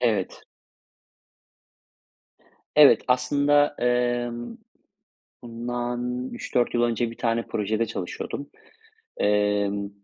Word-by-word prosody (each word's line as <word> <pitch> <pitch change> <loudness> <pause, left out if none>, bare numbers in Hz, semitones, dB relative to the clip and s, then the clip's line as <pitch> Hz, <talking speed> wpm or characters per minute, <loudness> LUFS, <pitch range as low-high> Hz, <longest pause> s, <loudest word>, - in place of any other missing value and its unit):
Evet. 110 -6 -1 2.3
Evet, 150 -2 +7
aslında, 145 +3 +2
emm, 120 - -1 0.9
bundan 120 +1 -4
3-4 120 - -1
yıl 120 - +1
önce 120 0 0
bir - - -12
tane 115 -1 -1
projede 110 +2 -1
çalışıyordum. 105 +9 -6 0.7
Emm, 105 -1 +1
120 Hz, 80 wpm, -25 LUFS, 110-125 Hz, 2.3 s, Evet